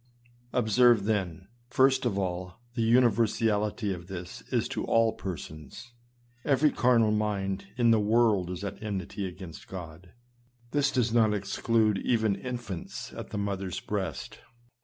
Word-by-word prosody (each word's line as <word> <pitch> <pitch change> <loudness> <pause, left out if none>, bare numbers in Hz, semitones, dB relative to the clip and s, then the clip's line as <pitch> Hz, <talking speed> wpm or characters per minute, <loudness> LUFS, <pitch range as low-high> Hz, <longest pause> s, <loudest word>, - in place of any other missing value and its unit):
Observe 120 -1 +4
then, 95 -4 -2 0.2
first 130 +1 +3
of 100 -4 -1
all, 90 -1 -3 0.2
the 120 - -2
universality 110 -3 +2
of 85 -1 -9
this 90 -8 -7
as - - +1
to - - -3
all 115 -1 +3
persons. 80 - -8 0.5
Every 145 +1 +3
carnal 115 -3 +3
mind 100 -2 -1
in 120 -2 +4
the 110 - +5
world 105 -4 +3
is 90 +2 -5
at 100 - -5
enmity 100 -1 -4
against 90 -3 -10
God. 90 -1 -9 0.6
This 145 -1 +2
does 120 -4 +1
not 110 -3 +4
exclude 105 +1 +1
even 110 -4 +1
infants 120 -4 -6
at - - -7
the - - -5
mother's 100 -2 -3
breast. 95 -6 -4
105 Hz, 135 wpm, -28 LUFS, 95-115 Hz, 0.6 s, the